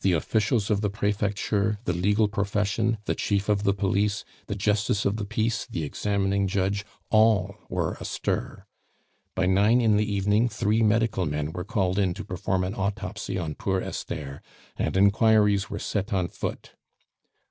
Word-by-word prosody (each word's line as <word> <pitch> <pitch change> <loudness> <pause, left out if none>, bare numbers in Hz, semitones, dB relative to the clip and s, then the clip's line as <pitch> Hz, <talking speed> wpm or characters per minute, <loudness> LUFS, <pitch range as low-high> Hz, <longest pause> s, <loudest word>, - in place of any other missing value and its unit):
The 95 - +3
officials 110 - +1
of 105 -1 +2
the 105 - +1
prefecture, 105 0 0
the 90 - 0
legal 100 +5 +2
profession, 105 +2 0
the - - 0
chief 100 -1 -1
of 105 -1 +2
the 100 - +2
police, 100 +1 0 0.2
the 100 - -3
justice 105 0 +1
of 100 +2 +1
the 105 - -3
peace, 115 +2 -1
the 80 - -3
examining 100 +4 0
judge, 100 +1 0 0.3
all 110 -3 +4 0.2
were - - -1
astir. - - -3 0.7
By 95 - +1
nine 100 +6 +4
in 110 -3 +3
the 105 0 0
evening 105 +4 +2
three 110 0 +1
medical 110 -4 +2
men 75 +1 -2
were 90 +1 -5
called 95 -2 0
in 95 -3 +1
to - - -7
perform 90 +1 -1
an 95 +2 -2
autopsy 100 -2 -3
on 80 -4 -3
poor 95 +4 -1
Esther, 70 -5 -5 0.3
and - - -1
inquiries 105 0 +4
were - - -4
set 105 +1 -3
on 95 -3 0
foot. - - -5
100 Hz, 165 wpm, -26 LUFS, 95-105 Hz, 0.7 s, all